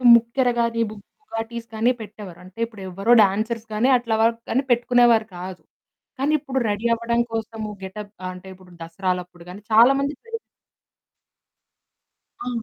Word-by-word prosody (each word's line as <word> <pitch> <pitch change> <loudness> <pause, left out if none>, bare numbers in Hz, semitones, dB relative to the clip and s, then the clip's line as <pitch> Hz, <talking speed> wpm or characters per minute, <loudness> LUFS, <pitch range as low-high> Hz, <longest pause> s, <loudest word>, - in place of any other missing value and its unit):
ముక్కెర 235 +2 +2
గాని 230 0 +1
బుగాడిస్ 230 - -8
గాని 230 +3 +3
పెట్టేవారు. 205 -4 -10
అంటే 185 +5 -15
ఇప్పుడు 215 -4 -13
ఎవ్వరో 195 +6 0
డాన్సర్స్ 220 +3 -1
గాని 235 +5 +2
అట్లా 230 -2 -1
వాళ్ళు 230 +1 +4
గానీ 265 +4 +1
పెట్టుకునేవారు 240 -2 +4
కాదు. 180 0 -7 0.6
కానీ 290 +3 +1
ఇప్పుడు 265 -2 -2
రెడీ 205 +3 0
అవ్వడం 235 +1 0
కోసము 225 -1 -4
గెటప్ 200 +2 -7 0.2
అంటే 180 +1 -12
ఇప్పుడు 185 -1 -18
దసరాలప్పుడు 180 0 -4
గానీ 195 +3 -9
చాలాామంది 275 +6 +5
పెడు 455 0 -4 2.1
ఆ! - - -3
225 Hz, 135 wpm, -23 LUFS, 195-235 Hz, 2.1 s, చాలాామంది